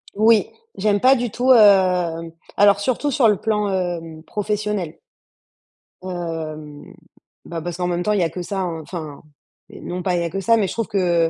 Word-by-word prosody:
Oui. 220 0 +4 0.3
J'aime 205 0 +1
pas 260 +2 +6
du 240 -2 -2
tout, 250 +4 +1
hem 180 -7 +4 0.2
alors 200 0 +5
surtout 255 +6 -1
sur 240 -3 +3
le 210 - +4
plan, 210 -2 -1
hem, 170 -4 -3
professionnel. 210 -5 -3 1.0
Hem, 160 -5 -6 0.5
bah, 170 -1 -5
parce 175 +1 -5
qu'en 180 -1 -1
même 175 0 -1
temps, 210 - +1
il 205 - +1
y 175 - +2
a 165 - 0
que 180 +3 -6
ça, 195 +2 -4
hein 170 -3 -3
enfin, 155 -3 -8 0.5
non 180 +1 -6
pas 180 -1 0
il 170 - 0
y - - -1
a 170 - -2
que 195 - -4
ça, 230 +4 +3
mais 200 -3 +1
je - - -5
trouve 230 -2 -2
que 175 -4 +1
185 Hz, 195 wpm, -21 LUFS, 170-210 Hz, 1.0 s, pas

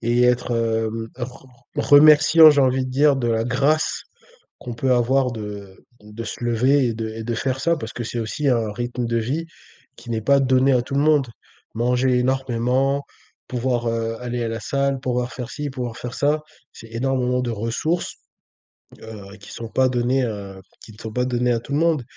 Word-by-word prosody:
et 120 +1 +1
être, 125 0 +2
hem, 115 -1 -1
re 125 +1 -8 0.3
r - - -1
remerciant, 155 +2 +8
j'ai 145 -1 +3
envie 130 0 +2
de 130 - -6
dire, 140 +2 +3
de 120 -3 -1
la 115 0 0
grâce 140 +6 0 0.5
qu'on 120 -2 -7
peut 130 +2 0
avoir, 125 +1 +2
de 105 -3 -8 0.2
de 105 +2 -9
se 115 +2 -6
lever 125 +3 +2
et 115 - -2
de 110 0 -4
et 110 0 -7
de 120 +1 -2
faire 130 +3 -2
ça, 170 +3 +1
parce 110 -6 -7
que 120 - -4
c'est 120 - -4
aussi 135 +6 -2
un 115 -4 +1
rythme 120 +2 -3
de 115 - -1
vie 135 +9 -2 0.5
qui - - -11
n'est 115 -1 -1
pas 140 +6 +3
donné 130 +1 +3
à 125 -2 +3
tout 135 - -7
le 140 - +2
monde. 145 -4 +3 0.5
Manger 125 +2 +1
énormément, 130 +2 0 0.4
pouvoir, 125 -1 -1
heu, 115 0 -2
aller 120 -1 -3
à 115 - -2
la 115 -1 -4
salle, 140 +3 -1
pouvoir 125 -1 -2
faire 125 -2 -7
ci, 145 0 -5
pouvoir 125 -3 -5
faire 125 -1 -7
ça, 150 +2 +1 0.3
c'est 115 - -13
énormément 125 +1 0
de 125 - -2
ressources, 115 +10 -2 0.9
heu, 105 -2 -10
qui 100 - -13
sont 115 -1 -7
pas 130 +3 +2
données, 125 +1 +1
heu, 100 -4 -5 0.2
qui - - -13
ne - - -18
sont 110 -1 -8
pas 125 +1 0
données 125 -1 0
à 115 - +1
tout 130 - -12
le - - +2
monde. 165 -5 +2
125 Hz, 205 wpm, -22 LUFS, 115-135 Hz, 0.9 s, remerciant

